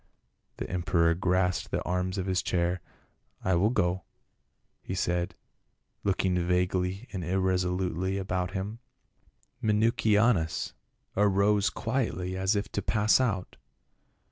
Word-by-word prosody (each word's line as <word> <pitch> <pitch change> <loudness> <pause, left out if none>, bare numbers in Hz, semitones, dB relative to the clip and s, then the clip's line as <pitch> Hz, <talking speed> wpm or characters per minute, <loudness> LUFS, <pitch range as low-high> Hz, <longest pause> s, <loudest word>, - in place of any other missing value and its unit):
The - - -4
emperor 85 -2 +2
grasped 90 0 +1
the - - -1
arms 90 +2 -1
of 95 - -1
his 95 -1 +1
chair, 90 0 0 0.3
" - - -34
I 95 - +2
will 90 +5 +3
go," 90 -5 +1 0.8
he - - -5
said, 90 0 -1 0.7
looking 95 -2 +1
vaguely 90 +4 0
and 95 -3 -3
irresolutely 95 0 0
about 90 -2 -1
him. 100 +4 -4 0.8
Minucianus 105 -4 +2 0.4
arose 100 0 +3
quietly 110 -7 -2
as 95 +2 +1
if 100 +1 -1
to - - -1
pass 110 +1 +3
out. 95 -8 -1
95 Hz, 115 wpm, -29 LUFS, 90-100 Hz, 0.8 s, will